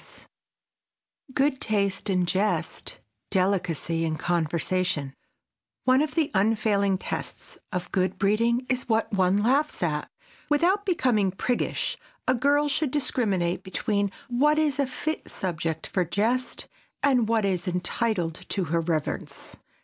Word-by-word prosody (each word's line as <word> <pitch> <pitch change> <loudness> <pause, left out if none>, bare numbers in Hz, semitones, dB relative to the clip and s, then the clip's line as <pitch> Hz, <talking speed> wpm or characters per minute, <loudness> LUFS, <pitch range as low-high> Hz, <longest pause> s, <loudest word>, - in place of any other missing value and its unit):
[Sidenote: - - -14 1.1
GOOD 270 -1 +2
TASTE 200 -2 0
IN 185 -2 +2
JEST] 200 +4 0
[Sidenote: - - -25 0.3
DELICACY 180 -4 0
IN 155 -1 -1
CONVERSATION] 170 -3 0 0.7
One 255 +1 +4
of 305 0 -2
the 320 -4 +1
unfailing 200 -1 +2
tests - - -6
of 180 -1 -4
good 185 0 0
breeding 230 +5 +2
is 255 -1 -1
what 220 -1 +1
one 190 +1 +3
laughs 275 0 +1
at. 150 -3 -1 0.4
Without 365 +8 +2
becoming 245 - +2
priggish, 235 +6 -1 0.3
a 255 - +4
girl 285 +4 +3
should 290 0 0
discriminate 200 -11 0
between 200 +1 -1 0.2
what 285 +5 +3
is 295 -3 +1
a 280 - +2
fit 310 +4 -3
subject 165 -3 -3
for 185 - 0
jest 225 +9 -1 0.4
and 255 -5 +3
what 225 -2 +2
is 185 -2 -1
entitled 180 0 0 0.2
to 195 - 0
her 170 - +3
reverence. 160 -2 -3
205 Hz, 135 wpm, -26 LUFS, 180-255 Hz, 1.1 s, One